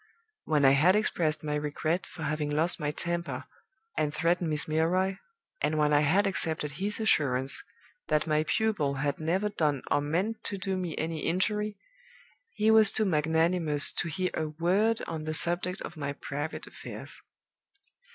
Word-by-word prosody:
When 150 -3 +2
I 135 - +7
had 155 +8 +5
expressed 160 -8 +1
my 150 -1 -2
regret 150 +4 -1
for 160 - -9
having 150 0 -1
lost 160 +5 +1
my 150 -2 -1
temper 170 +3 -3 0.5
and 150 - 0
threatened 170 +2 0
Miss 150 -2 +2
Milroy, 180 +5 +1 0.4
and 155 - 0
when 150 -1 +2
I 145 - +5
had 170 +8 +3
accepted 160 -6 -1
his 195 +8 -2
assurance 135 -11 +1 0.4
that 150 0 +1
my 155 -1 +1
pupil 160 -4 0
had 140 +1 -2
never 185 +6 0
done 150 -9 0
or 145 - +3
meant 190 +10 -2
to 200 - -3
do 190 0 -2
me 180 -4 -4
any 160 0 -2
injury, 210 +6 0 0.7
he 220 +1 +2
was 220 -2 +7
too 215 - +2
magnanimous 160 -2 +2
to 175 - -2
hear 185 +4 -1
a 155 - -2
word 190 +9 +1
on 160 -2 -5
the 155 0 -2
subject 175 +3 +1
of - - -7
my 140 -1 -3
private 145 +2 -5
affairs. - - -9
160 Hz, 165 wpm, -29 LUFS, 150-185 Hz, 0.7 s, I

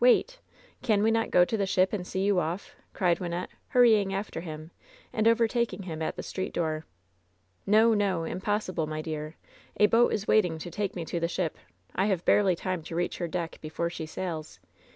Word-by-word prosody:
Wait! - - +4 0.4
Can 215 -5 +2
we 225 - +4
not 225 0 +1
go 175 0 +5
to 225 - -2
the 200 -3 0
ship 185 +1 +2
and 180 -4 -3
see 190 - -2
you 200 -2 +3
off?" 170 +4 -4 0.2
cried 175 -3 +1
Wynnette, 175 0 -3 0.2
hurrying 220 -6 +5
after 195 -4 -4
him, 155 -1 -8 0.4
and 220 0 +2
overtaking 230 -3 +2
him 160 -3 -6
at 160 - -2
the - - -6
street 185 - -4
door. 155 -2 -1 0.8
"No! 220 +3 +5
no! 195 -5 +1
Impossible, 185 -2 -2
my 155 0 -4
dear! 155 0 -5 0.4
A 210 - +7
boat 230 +3 +4
is 210 0 -2
waiting 180 -7 +3
to 170 +2 -7
take 200 +2 -2
me 170 -3 -4
to 170 - -2
the 170 - 0
ship! 170 -2 -2 0.4
I 195 - +1
have 190 -4 0
barely 195 -3 +4
time 185 0 -3
to 165 - -6
reach 175 +1 -1
her 175 - -1
deck 170 0 -4
before 170 +2 -3
she 160 -2 -5
sails! 160 -2 -5
185 Hz, 200 wpm, -28 LUFS, 165-210 Hz, 0.8 s, A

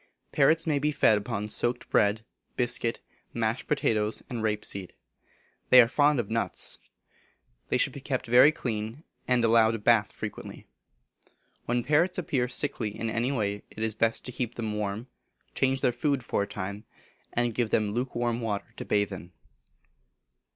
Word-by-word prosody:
Parrots 160 +3 +3
may 150 -3 +1
be 150 +2 +1
fed 110 -6 +4
upon 105 0 -4
soaked 120 +3 -2
bread, 105 +1 +2 0.3
biscuit, 120 -1 0 0.3
mashed 115 +1 -1
potatoes, 110 -7 0
and 120 -2 -3
rape 105 -1 -1
seed. 95 -2 -4 0.8
They 130 - +9
are 120 - +8
fond 145 +2 +3
of 115 - -1
nuts. 110 -4 -1 0.9
They - - +2
should - - +1
be - - -8
kept - - -2
very 125 +5 +7
clean, 115 -1 -4 0.2
and 125 -2 +3
allowed 115 0 +4
a - - -2
bath 105 -1 +3
frequently. - - -7 1.0
When 120 0 0
parrots 160 +7 +2
appear 135 -8 0
sickly 125 -3 -2
in 115 -1 -2
any 120 +4 0
way, 105 -6 -1
it 110 - -6
is 110 -1 0
best 115 +1 0
to 125 - -4
keep 120 -1 -4
them 110 -2 -3
warm, 105 +2 -3 0.5
change 135 0 +1
their 125 - +3
food 135 +2 -1
for 110 - -1
a 100 - -2
time, 100 +3 -5 0.5
and 120 -1 0
give 120 -1 0
them 105 -1 +1
lukewarm 120 -1 -1
water 105 -3 -3
to - - -6
bathe 100 -1 +1
in. 90 -1 -9
115 Hz, 165 wpm, -28 LUFS, 105-125 Hz, 1.0 s, They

